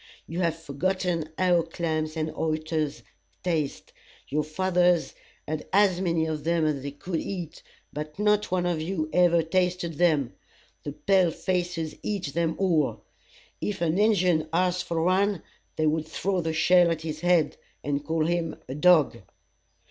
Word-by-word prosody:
You 165 +2 -5
have 170 -3 +1
forgotten 165 +2 -2
how 180 -2 +3
clams 160 -1 -3
and 155 0 -2
oysters 155 -4 -2 0.4
taste. 150 - -2 0.4
Your 150 +2 0
fathers 180 +2 +1 0.3
had 155 0 -4
as 190 -2 +3
many 170 -3 +1
of 155 -2 -3
them 165 0 +1
as 150 -3 0
they 140 - -4
could 160 +4 -4
eat; 175 -5 -6 0.3
but 150 +1 -6
not 210 0 +2
one 180 -1 0
of 170 -3 0
you 160 -2 -3
ever 175 -2 +4
tasted 175 -1 -1
them. 155 -8 +2 0.5
The 145 - -6
pale 190 +1 +3
faces 175 -2 -2
eat 190 -9 -3
them 165 -1 0
all. 170 -7 +1 0.6
If 210 - -2
an 170 +2 +1
Injun 180 -7 +3
asked 180 +1 +1
for 165 -1 -1
one, 190 0 +2 0.3
they 155 - 0
would 155 0 0
throw 190 +2 -1
the 165 -1 -2
shell 175 +2 +4
at 165 -1 -1
his 155 -1 -4
head, 175 -3 +2 0.3
and 145 0 -1
call 160 +1 0
him 170 -1 -1
a 130 - -5
dog. 155 0 +4
165 Hz, 155 wpm, -26 LUFS, 155-180 Hz, 0.6 s, ever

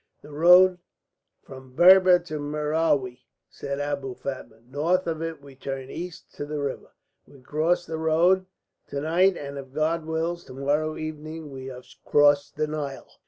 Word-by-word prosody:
"The 150 - -13
road 180 +4 +6 0.6
from 130 -1 -13
Berber 185 +2 +7
to 170 -3 -7
Merowi," 150 -3 0 0.3
said 140 0 -5
Abou 140 -3 -3
Fatma. 130 -4 -7
"North 150 +9 0
of 165 -1 -3
it 165 -3 -5
we 140 -1 -13
turn 135 0 -6
east 175 0 -8
to 145 - -4
the 150 0 -4
river. 140 -2 -5 0.3
We 140 - -17
cross 160 +6 0
that 160 - -5
road 175 +4 +3 0.4
to 140 - -4
night; 175 +5 +2
and 140 0 -6
if 135 -1 -11
God 155 +2 0
wills, 165 +2 -2
to - - -11
morrow 150 +3 -1
evening 155 0 -7
we 130 -1 -8
shall 130 - -7
have 125 - -12 0.2
crossed 145 -1 +3
the 155 - 0
Nile." 150 -3 -5
150 Hz, 165 wpm, -25 LUFS, 140-165 Hz, 0.6 s, Berber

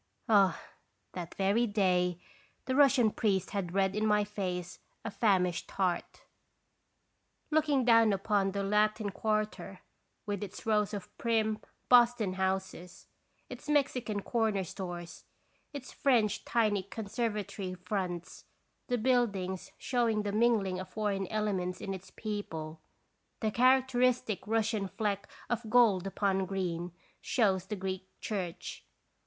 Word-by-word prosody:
Ah! 200 -4 +4 0.5
that 175 -2 -6
very 200 +5 +2
day 180 -4 +1 0.5
the 260 - -1
Russian 270 -5 +5
priest 195 -5 0
had 190 -3 -3
read 190 0 +2
in 215 +1 +1
my 210 -1 +3
face 185 -4 -4 0.3
a 225 - -3
famished 185 -6 +1
heart. 180 -3 -2 1.3
Looking 300 -4 +2
down 230 -2 +6
upon 195 0 +1
the 200 0 -2
Latin 210 +1 +1
Quarter, 215 +1 -2 0.4
with 205 -2 -3
its 200 -1 -8
rows 210 -2 +1
of 200 - -8
prim 220 -2 +1 0.3
Boston 240 -5 +5
houses, 190 -1 -3 0.4
its - - -9
Mexican 250 -8 +1
corner 220 -5 0
stores, 175 -1 -7 0.5
its 280 -3 -8
French 235 -7 +2
tiny 215 -4 +2
conservatory 205 -2 -4
fronts, 180 -2 -4 0.4
the 245 - +1
buildings 215 -7 0
showing 230 -4 0
the 205 - -2
mingling 210 -4 +2
of 185 - -7
foreign 200 -3 -1
elements 190 -4 -1
in 195 - -4
its 190 0 -9
people, 165 -8 -5 0.6
"the 220 -2 0
character 255 +1 +3
istic 250 -4 +2
Russian 220 -2 0
fleck 200 -1 -2 0.2
of 235 -2 -2
gold 215 -6 +4
upon 195 -1 0
green" 175 -2 -3 0.3
shows 190 -6 +1
the 210 - -3
Greek 190 -1 -4
church. 185 -6 -5
205 Hz, 125 wpm, -31 LUFS, 190-225 Hz, 1.3 s, down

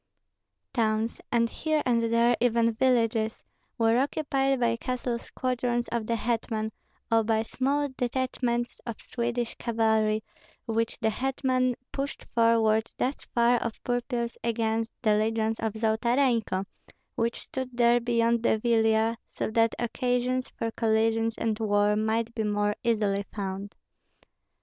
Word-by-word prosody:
Towns, 220 -1 0
and 235 -1 +3
here 310 +5 -1
and 230 -2 +2
there 235 +1 +4
even 230 -1 +3
villages, 230 -2 +1 0.3
were 230 +1 +3
occupied 270 -1 0
by 235 -1 +2
castle 245 -1 -3
squadrons 245 -1 -2
of 230 -2 -2
the 235 - +1
hetman, 225 -1 -1 0.4
or 225 0 +4
by 220 0 +1
small 280 +5 0
detachments 245 -1 -1
of 230 - -5
Swedish 240 -1 -2
cavalry 220 -2 +1 0.4
which 230 0 -1
the 220 -1 +2
hetman 255 0 0 0.2
pushed 280 +1 -4
forward 225 -1 +3
thus 265 +3 -2
far 240 +1 +4
of 230 - -2
purpose 245 -1 -2
against 225 -1 0
the 215 -2 +4
legions 220 +1 0
of 220 -2 -1
Zolotarenko, 225 -2 +1 0.5
which 230 +1 -1
stood 255 -2 -6
there 240 0 +5
beyond 235 -1 +2
the 225 - +2
Vilia, 225 0 +2 0.2
so - - -2
that 225 0 +2
occasions 250 +1 -1
for 225 0 -4
collisions 225 0 +1
and 220 -1 -1
war 205 -1 +2
might 220 +2 0
be 225 - -2
more 205 -1 0
easily 210 -4 +1
found. 195 0 -4
230 Hz, 130 wpm, -27 LUFS, 220-245 Hz, 0.5 s, there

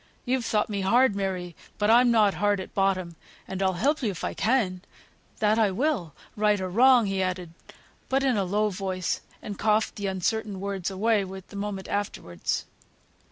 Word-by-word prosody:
You've 250 -1 0
thought 210 -2 +1
me 200 -2 -3
hard, 235 +3 +4
Mary, 185 -3 -3 0.2
but 210 +1 +2
I'm 245 +1 +6
not 215 -4 +4
hard 205 -1 +1
at 190 - -8
bottom, 185 -3 0 0.3
and 190 0 -4
I'll 190 -1 +2
help 285 - +1
you 230 - 0
if 185 - -6
I - - -2
can; 215 -6 +1 0.6
that 215 +1 +2
I 215 -2 +4
will, 195 - -1 0.2
right 210 -1 +2
or 185 -1 -3
wrong," 245 +2 +6
he 195 -1 -1
added; 180 -2 -3 0.6
but 270 +1 +2
in 265 -3 +2
a 200 - +1
low 210 +3 0
voice, 185 -1 -2 0.2
and 205 -2 -6
coughed 215 +1 +1
the 200 -1 -2
uncertain 195 +2 -2
words 195 -2 -3
away 205 +2 +1
the 190 +1 -9
moment 200 -1 -4
afterwards. 140 - -3
200 Hz, 180 wpm, -26 LUFS, 190-220 Hz, 0.6 s, I'm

